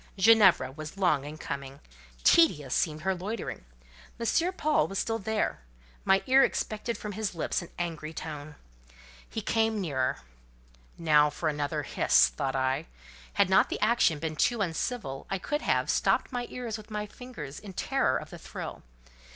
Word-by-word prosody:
Ginevra 190 -10 +6
was 155 +5 -8
long 155 -8 +2
in 150 +1 -7
coming: 140 -2 -6 0.4
tedious 150 - +4
seemed 155 -1 0
her 190 +3 +1
loitering. 190 - -5 0.5
M. 335 +10 +1
Paul 305 -4 +2
was 195 - -5
still 225 +2 -1
there; 220 +1 -1 0.5
my 195 0 +4
ear 270 +1 +6
expected 225 0 -1
from 210 - -6
his 205 -2 -3
lips 165 - -1
an 175 - -10
angry 165 -3 -4
tone. 150 -2 -7 0.7
He 220 - -4
came 225 0 +1
nearer. 140 -9 -1 0.8
"Now 150 -3 +4
for 155 +2 -2
another 145 -2 -2
hiss!" - - +4
thought 130 - -3
I: 130 +4 0 0.5
had 200 -2 +3
not 190 - +4
the - - -3
action 215 -8 +3
been 155 +1 -4
too 240 +7 +2
uncivil 175 - -3
I 195 - 0
could 295 - -2
have, - - +1
stopped - - +1
my 245 -1 -3
ears 235 -3 -4
with 215 - -13
my 210 -1 -3
fingers 205 - -9
in 200 -3 -10
terror - - +1
of - - -8
the - - -9
thrill. - - -7
185 Hz, 165 wpm, -29 LUFS, 150-220 Hz, 0.8 s, Ginevra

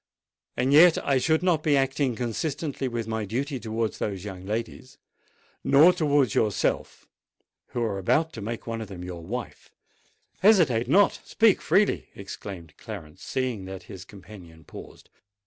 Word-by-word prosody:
And 130 +3 +1
yet 165 +3 +7
I 135 -2 +3
should 160 +5 +1
not 175 -4 +2
be 150 -2 +2
acting 135 -1 0
consistently 135 +4 -3
with 120 -2 -4
my 110 -1 -2
duty 130 +7 -3
towards 115 -1 -3
those 95 -3 -3
young 95 -2 -8
ladies—no, 115 +4 -4
nor 175 +4 +8
towards 145 - +2
yourself 105 -3 -1 0.6
who 120 - -3
are 100 -4 -2
about 160 - +1
to 110 - -7
make 115 +3 -5
one 115 -1 -4
of 110 - -6
them 95 -2 -9
your 90 -2 -7
wife——" 120 +8 -7 0.7
"Hesitate 165 - +4
not: 195 +9 +4
speak 225 -3 +3
freely!" 195 +6 +1
exclaimed 95 -4 -9
Clarence, 90 -9 -9
seeing 125 -7 -3
that 95 -1 -8
his 95 -3 -10
companion 90 -4 -14
paused. - - -13
115 Hz, 150 wpm, -26 LUFS, 100-145 Hz, 0.7 s, nor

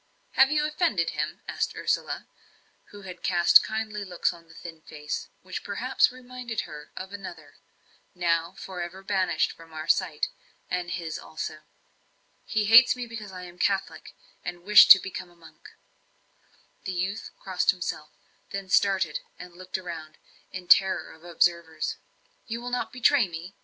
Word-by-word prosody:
"Have 265 0 +5
you 300 0 +1
offended 300 - 0
him?" - - -3
asked - - -2
Ursula, - - -1 0.6
who 205 -1 -13
had 180 -2 -9
cast 175 -2 +6
kindly 215 -1 -4
looks 180 -2 -1
on 170 -1 -16
the 160 - -17
thin 165 -2 -10
face, 150 -1 -6 0.2
which - - -6
perhaps - - +1
reminded 250 -2 -6
her 150 -2 -10
of 190 +1 -7
another 170 -7 -9 0.6
now 170 -1 0
for 185 -2 -7
ever 180 +3 -7
banished 190 -5 +1
from 165 -1 -15
our 155 0 -6
sight, - - +1 0.4
and 180 -1 -2
his 165 -3 -4
also. 155 0 -6 0.9
"He 215 -1 0
hates 230 +5 +8
me 250 -1 -5
because 220 -4 -8
I 180 -1 -8
am 175 0 -11
a - - -24
Catholic, 195 0 -1 0.3
and 175 0 -6
wish 210 +2 +9
to - - +12
become 185 -1 -7
a 175 - -21
monk." 165 -1 -16 1.2
The 190 - -3
youth 190 +4 -3
crossed 185 -2 -1
himself, 175 -5 -1 0.4
then 195 -1 -6
started 190 -5 +2 0.2
and 180 -1 -11
looked 185 +1 -5
round, 165 -4 -8 0.3
in 185 -1 -7
terror 190 +1 +4
of 160 - -19
observers. 170 -1 0 0.5
"You 230 0 -4
will 245 +1 -6
not 250 - -2
betray 255 -2 +3
me? 170 +2 -8
185 Hz, 160 wpm, -27 LUFS, 170-205 Hz, 1.2 s, to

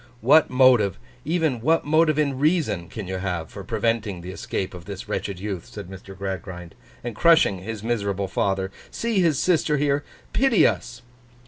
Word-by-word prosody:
'What 145 +7 +5
motive—even 125 - +2
what 165 +7 +2
motive 155 0 +3
in 140 -3 0
reason—can 125 - 0
you 95 0 -3
have 90 -4 -3
for 100 - -8
preventing 110 -2 -1
the 90 +2 -7
escape 95 0 -4
of 90 -2 -10
this 100 -2 -7
wretched 100 -3 -3
youth,' 95 -3 -5
said 100 -3 -9
Mr. 95 0 -11
Gradgrind, 90 -3 -6 0.3
'and 120 -2 -5
crushing 160 - +4
his 105 +2 -6
miserable 100 -4 -1
father? 95 +1 -1 0.2
See 230 -3 -1
his 165 -6 +3
sister 160 -3 +2
here. 145 0 +1 0.3
Pity 265 -5 +4
us! 120 -1 -1
110 Hz, 155 wpm, -24 LUFS, 95-145 Hz, 0.3 s, What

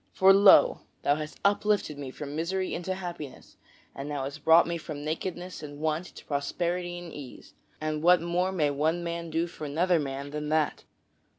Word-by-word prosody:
For 190 +1 +6
lo! 195 -7 +7 0.2
thou 145 - +3
hast 155 0 -7
uplifted 205 -6 +1
me 140 -2 -5
from 145 +2 -7
misery 185 +4 -1
into 185 +2 -3
happiness, 175 -7 -8 0.4
and 140 +2 -6
thou 145 -2 -2
hast 140 +2 -6
brought 165 +1 +7
me 170 0 -3
from 150 -2 -7
nakedness 175 +3 -4
and 145 -1 -9
want 160 +3 -1
into - - -14
prosperity 175 +5 -2
and 175 -2 -9
ease, 140 -4 -10 0.3
and 155 0 -2
what 175 +2 +6
more 175 +2 0
may 155 -6 +1
one 160 +5 0
man 170 0 -4
do 165 +1 0
for 170 -3 -8
another 170 +4 +2
man 140 0 -4
than 150 0 -4
that?" 155 -1 0
160 Hz, 185 wpm, -28 LUFS, 150-175 Hz, 0.4 s, lo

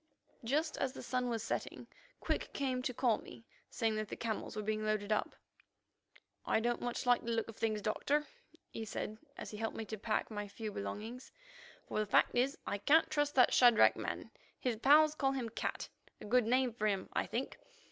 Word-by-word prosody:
Just 300 +7 0
as 260 -1 0
the - - -8
sun 250 -1 -1
was 225 -2 -2
setting, 225 - -3 0.3
Quick - - -2
came 260 -3 -1
to 255 - -1
call 240 -2 +2
me, 115 -2 -12 0.2
saying 225 -1 0
that 215 0 -2
the - - -5
camels 220 -2 -3
were 215 - -3
being 215 +1 -1
loaded 215 -1 -1
up. 215 - 0 1.1
"I - - +2
don't 240 +1 0
much 245 0 -3
like 245 0 +4
the 235 - -4
look 230 -1 0
of 225 - -9
things, 215 -1 -1
Doctor," 290 +8 +1 0.5
he 225 - -5
said 215 0 -5 0.2
as - - -7
he 210 - -7
helped 225 +1 -3
me 225 - -4
to 220 -1 -6
pack 215 +2 -1
my 205 -1 -4
few 215 +1 -6
belongings, 215 - -6 0.6
"for - - -2
the 215 - 0
fact - - +4
is 255 +3 +1
I 200 - -2
can't 310 +9 +4
trust 290 -1 +1
that 255 - +6
Shadrach 240 -3 +7
man. - - -5 0.3
His 250 -3 0
pals 300 +5 +6
call 270 -3 +1
him 250 -4 -2
'Cat,' 225 - -3 0.3
a - - -9
good 235 +1 +3
name 255 0 +2
for 215 -2 0
him, 195 -2 0
I - - 0
think. - - -3
230 Hz, 205 wpm, -35 LUFS, 215-255 Hz, 1.1 s, Shadrach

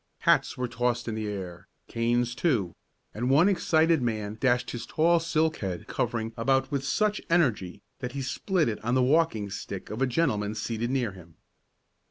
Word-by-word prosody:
Hats - - +3
were 125 0 -1
tossed 120 0 -1
in 115 - -2
the 110 -1 -3
air, 95 -3 -6 0.2
canes 120 +1 0
too, 120 - 0 0.4
and 120 +4 -2
one 150 +7 +5
excited 165 -5 +3
man 110 -3 -2
dashed 125 -2 +1
his 120 -1 -6
tall 170 +2 +3
silk 160 -1 0
head 95 -4 -4
covering 115 -1 -2
about 135 +4 +1
with 140 -2 -1
such 210 +8 0
energy 110 - +1 0.2
that 125 -1 -5
he 140 -1 -3
split 170 +5 0
it 110 -2 -3
on 120 +3 +1
the 130 - +3
walking 130 -8 +2
stick - - -6
of 110 +4 -5
a 135 - +3
gentleman 115 -7 0
seated 115 +1 -2
near 125 -5 0
him. 85 -3 -15
120 Hz, 180 wpm, -27 LUFS, 110-145 Hz, 0.4 s, one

